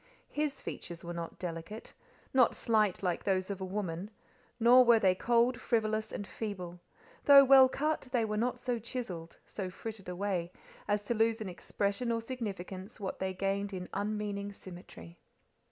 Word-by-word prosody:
His 300 -1 -2
features 170 0 -7
were 175 - -4
not 170 -1 -6
delicate, 175 +5 -6 0.4
not 255 -3 +5
slight 215 -4 +1
like 180 -2 0
those 190 0 0
of 195 -1 -5
a - - -2
woman, 185 -1 -4 0.5
nor 245 +2 +8
were 235 -1 +6
they 190 -4 +4
cold, 235 +5 +2
frivolous, 215 -2 0
and 205 - -5
feeble; 185 -5 -6 0.5
though 280 -1 +10
well 265 -1 +8
cut, 300 -1 -1
they 240 -3 +2
were 215 -1 -2
not 240 +4 0
so 245 -2 -2
chiselled, 205 -8 -6
so 190 -3 -5
frittered 195 0 -7
away, 180 -2 -2 0.4
as 205 0 +1
to 220 - -1
lose 225 0 +2
in 215 -3 -4
expression 200 +6 -2
or 230 - +1
significance 205 -4 -6
what 195 -2 -4
they 190 0 -1
gained 195 +1 -2
in 180 -1 -5
unmeaning 205 0 -2
symmetry. 175 - -12
205 Hz, 165 wpm, -32 LUFS, 185-230 Hz, 0.5 s, though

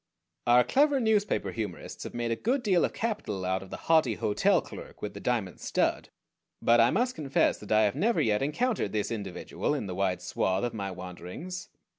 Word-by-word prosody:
Our 120 +1 +6
clever 285 - +3
newspaper 220 -3 +1
humorists 110 -3 -6
have - - -7
made 120 -1 -1
a - - +2
good 245 - 0
deal 185 -6 +3
of - - -3
capital 200 - -3
out 95 0 0
of 95 - -11
the - - -6
haughty 155 -9 +4
hotel 105 - +2
clerk - - -10
with 105 -1 -3
the 100 - -8
diamond 110 -6 -1
stud; - - 0 0.5
but 120 0 +4
I 115 +1 +6
must 245 - +1
confess 140 - +1
that 105 - -10
I 110 0 +5
have 105 - +2
never 220 +10 +2
yet 105 -2 +2
encountered 150 - 0
this 105 0 -1
individual 105 - -3
in 135 - -3
the 95 - -4
wide 90 -1 -1
swath 95 +1 0
of 120 - -1
my 100 -3 -3
wanderings. 95 - -7
115 Hz, 200 wpm, -29 LUFS, -, 0.5 s, Our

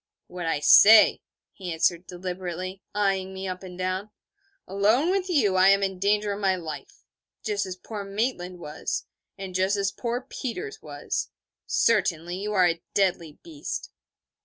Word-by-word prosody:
'What 180 -2 -6
I 150 -3 0
say,' 215 +7 +8 0.3
he 185 -3 -6
answered 170 +2 0
deliberately, 185 +1 -5
eyeing 195 -2 0
me 190 0 -5
up 185 0 -5
and 180 -2 -10
down: 185 +3 -2 0.6
'alone 215 - +2
with 380 -1 -1
you 215 - +2
I 185 +1 +6
am 195 0 +5
in 190 -1 -2
danger 205 +1 +1
of 200 - -4
my 190 -2 +2
life. 155 -6 -8 0.4
Just 205 -3 -1
as 185 - -5
poor 205 +2 -7
Maitland 195 -3 -3
was, 150 -3 -4 0.3
and 190 -1 -7
just 190 +2 +1
as 195 -1 0
poor 240 0 -3
Peters 295 - -6
was. - - -4 0.4
Certainly, 175 -5 +1
you 205 +2 -4
are 185 -4 +4
a 170 -1 -1
deadly 180 -5 +1
beast.' 315 -3 -6
190 Hz, 160 wpm, -26 LUFS, 180-210 Hz, 0.6 s, say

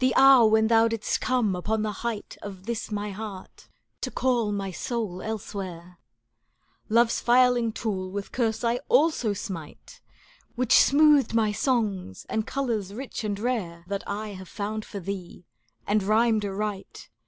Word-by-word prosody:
hour 265 -4 +8
when 220 0 +4
thou 225 0 +5
didst 225 -1 -2
come 240 -7 +1
upon 215 +4 -1
the 215 - -1
height 230 -3 -4
Of 195 -2 -9
this 235 -1 -3
my 210 -1 -3
heart 200 -2 -9 0.3
to - - -2
call 240 -5 0
my 195 -2 -3
soul 195 -1 -3
elsewhere; 185 -5 -6 0.4
" - - -42
Love's 230 +1 +3
filing 245 -1 +4
tool 195 -4 -3
with 200 +1 -5
curse 225 -3 -1
I 235 +1 +2
also 290 -9 +3
smite. 175 -6 -8 0.5
Which 250 +1 +1
smoothed 290 -3 +5
my 220 -2 +3
songs, 210 - -1
and 220 -1 -1
colours 230 -8 -2
rich 255 -1 -6
and 205 -2 -2
rare. 205 -8 -2
That 200 0 -3
I 210 +2 -4
have 190 -2 -9
found 215 +1 -4
for 200 - -7
thee, 185 -2 -7 0.4
and 210 +1 +2
rhymed 215 +1 +2
aright. 200 0 -5
215 Hz, 155 wpm, -26 LUFS, 195-235 Hz, 0.5 s, hour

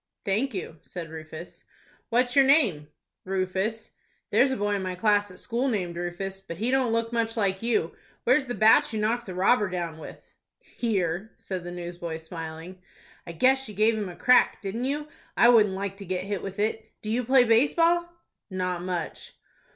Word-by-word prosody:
"Thank 220 +5 0
you," 165 -4 -6
said 170 -3 -8
Rufus. 160 +1 -9 0.5
"What's 245 +1 +1
your 275 - +7
name?" 235 - +3 0.4
"Rufus." 190 +4 -2 0.4
"There's 270 - +4
a 260 - -1
boy 205 0 0
in 200 - -1
my 185 -1 -3
class 205 +1 +2
at 180 - -13
school 245 +6 -2
named 185 -8 -1
Rufus, 175 +3 -4
but 170 -4 -8
he 230 +6 -1
don't 260 -3 +2
look 230 +1 0
much 230 0 0
like 195 -3 0
you. 225 -8 0 0.3
Where's 265 +3 +3
the 245 - -3
bat 255 +7 +5
you 220 - -2
knocked 225 +2 0
the 185 - -6
robber 200 +3 +3
down 170 -3 -4
with?" - - -9 0.4
"Here," 195 -3 -2
said 185 -2 -5
the 175 - -6
newsboy, 175 -2 -5
smiling. 165 +2 -8 0.5
"I 170 - -6
guess 265 +8 +2
you 210 - -9
gave 215 +3 +3
him 210 -3 -3
a 175 - -9
crack, 250 +6 +4
didn't 215 +5 -3
you? 295 +2 -2 0.3
I 235 - +7
wouldn't 210 -5 +5
like 195 0 -4
to 200 - -8
get 185 0 -2
hit 200 -1 -3
with 195 -1 -7
it. 215 +1 -1 0.2
Do 215 - -3
you 245 +2 0
play 255 +1 +5
base 230 +4 +3
ball?" 345 +1 +3 0.4
"Not 180 -2 -2
much." 180 -1 -4
205 Hz, 190 wpm, -26 LUFS, 180-235 Hz, 0.5 s, your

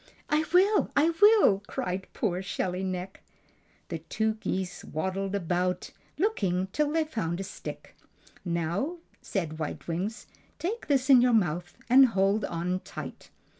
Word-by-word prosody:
"I 305 +1 +3
will! 395 +4 +4
I 315 +4 +5
will!" 410 - +6
cried 185 +1 -3
poor 185 -4 -1
Shelly 185 -1 -2
Neck. 185 0 -4 0.7
The - - -3
two 220 -1 -1
geese 190 -4 -4
waddled 190 +4 -2
about, 180 0 -1 0.3
looking 190 - 0
till 300 -1 +1
they 320 +1 +2
found 185 - -3
a - - -2
stick. 200 - -8 0.5
"Now," 175 - -1 0.2
said 160 -5 -3
White 155 - -5
Wings, 185 +7 -3 0.3
"take 425 +8 -3
this 275 -1 +3
in 255 -2 +8
your 245 -1 +4
mouth 175 -4 0
and 260 +2 +8
hold 195 -1 +1
on 175 +2 -2
tight!" - - -9
195 Hz, 140 wpm, -28 LUFS, 180-270 Hz, 0.7 s, in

